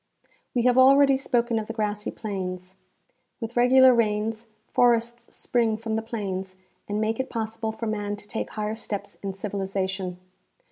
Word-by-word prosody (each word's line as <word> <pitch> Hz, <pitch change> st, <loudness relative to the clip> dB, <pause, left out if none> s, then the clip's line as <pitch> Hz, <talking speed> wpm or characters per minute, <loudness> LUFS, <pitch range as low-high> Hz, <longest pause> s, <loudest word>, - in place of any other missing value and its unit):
We 240 Hz, -, +2 dB
have 250 Hz, +1 st, +4 dB
already 275 Hz, +1 st, +7 dB
spoken 240 Hz, -4 st, +1 dB
of 215 Hz, -, -5 dB
the 225 Hz, -, -4 dB
grassy 210 Hz, -2 st, -2 dB
plains. 185 Hz, -3 st, -5 dB, 0.7 s
With 225 Hz, 0 st, -6 dB
regular 255 Hz, +1 st, +7 dB
rains 220 Hz, 0 st, 0 dB, 0.2 s
forests 235 Hz, 0 st, +1 dB
spring 230 Hz, -3 st, +1 dB
from 220 Hz, 0 st, -3 dB
the 220 Hz, -, 0 dB
plains, 195 Hz, -5 st, -4 dB, 0.3 s
and 205 Hz, +1 st, -1 dB
make 220 Hz, +2 st, 0 dB
it 260 Hz, -, -2 dB
possible 225 Hz, -1 st, -3 dB
for 220 Hz, +1 st, -6 dB
man 205 Hz, -1 st, -2 dB
to 205 Hz, 0 st, -13 dB
take 220 Hz, -, -4 dB
higher 215 Hz, 0 st, -3 dB
steps 210 Hz, -2 st, -6 dB
in 195 Hz, -1 st, -3 dB
civilization. 190 Hz, -2 st, -3 dB
220 Hz, 155 wpm, -26 LUFS, 205-235 Hz, 0.7 s, already